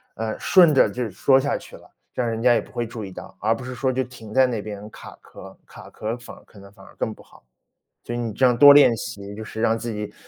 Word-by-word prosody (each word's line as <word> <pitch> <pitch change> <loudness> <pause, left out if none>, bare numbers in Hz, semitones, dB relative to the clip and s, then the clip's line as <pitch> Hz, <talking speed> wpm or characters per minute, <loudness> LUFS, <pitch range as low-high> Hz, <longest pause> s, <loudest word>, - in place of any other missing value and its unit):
呃， 110 0 -4
顺 175 -5 +5
着 130 - +4
就 120 +1 -4
说 130 +8 +3
下 140 +1 -1
去 - - -13
了， - - -20 0.2
让 125 - -2
人 115 0 -4
家 125 0 +5
也 115 - +2
不 - - -11
会 120 - -3
注 110 -2 -7
意 95 - -9
到。 - - -11
而 110 +2 +1
不 120 - -9
是 125 0 -6
说 130 +1 -1
就 130 - 0
停 115 -4 -12
在 130 0 +5
那 115 -4 -3
边 105 0 -8
卡 - - -13
壳 - - -15
儿， - - -12
卡 - - -14
壳 110 - -9
儿 115 - -2
反 120 - -12
而 - - -18
可 100 - -18
能 100 0 -14
反 95 -2 -17
而 - - -17
更 110 - -3
不 - - -17
好， - - -22 0.6
所 120 - -5
以 120 - -3
你 115 -3 -3
这 130 - +3
样 125 -1 +2
多 145 +2 +9
练 140 -5 +6
习， 100 -1 -8
就 110 - -8
是 110 0 -8
让 115 -1 +2
自 115 +1 -5
己， 105 -1 -6
115 Hz, 315 characters per minute, -22 LUFS, 105-125 Hz, 0.6 s, 多